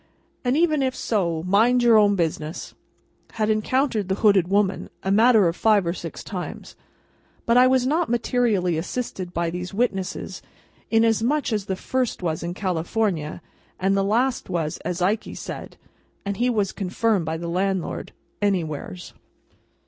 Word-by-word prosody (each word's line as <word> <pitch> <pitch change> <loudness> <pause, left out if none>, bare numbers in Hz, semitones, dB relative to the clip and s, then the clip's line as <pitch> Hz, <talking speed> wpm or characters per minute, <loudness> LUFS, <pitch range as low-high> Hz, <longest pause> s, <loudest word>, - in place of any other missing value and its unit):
and 250 +2 +1
even 310 -3 +3
if 260 -1 0
so, 170 -7 -1
mind 225 +7 +3
your 235 -1 +6
own 205 -2 +5
business,'" 160 -2 -3 0.6
had 215 -1 +1
encountered 220 -1 0
the 190 - +1
hooded 195 -4 +5
woman, 200 0 +1
a 190 - 0
matter 220 -1 +5
of 165 - -1
five 210 -3 +3
or 170 - 0
six - - -7
times. - - -7 0.7
But, 235 - +3
I 250 +1 +7
was 255 -1 +3
not 315 +5 +1
materially 225 -8 +1
assisted 185 -1 -4
by 170 -1 -1
these 180 +2 -5
witnesses: 195 -5 -2 0.5
inasmuch 230 +5 +2
as 210 -2 -1
the 190 - -2
first 255 0 -2
was 160 -2 -1
in 175 +1 -4
California, 175 -3 -2 0.4
and 195 +1 +2
the 195 - +2
last 240 +5 0
was, 165 -4 -2
as 180 0 -3
Ikey 210 +4 -1
said - - -7 0.5
(and 200 -1 -3
he 245 +3 +2
was 210 -5 0
confirmed 200 -1 0
by 160 +1 -2
the 170 +1 -5
landlord), 190 +1 -2 0.3
Anywheres. 160 - -2
200 Hz, 155 wpm, -23 LUFS, 180-235 Hz, 0.7 s, I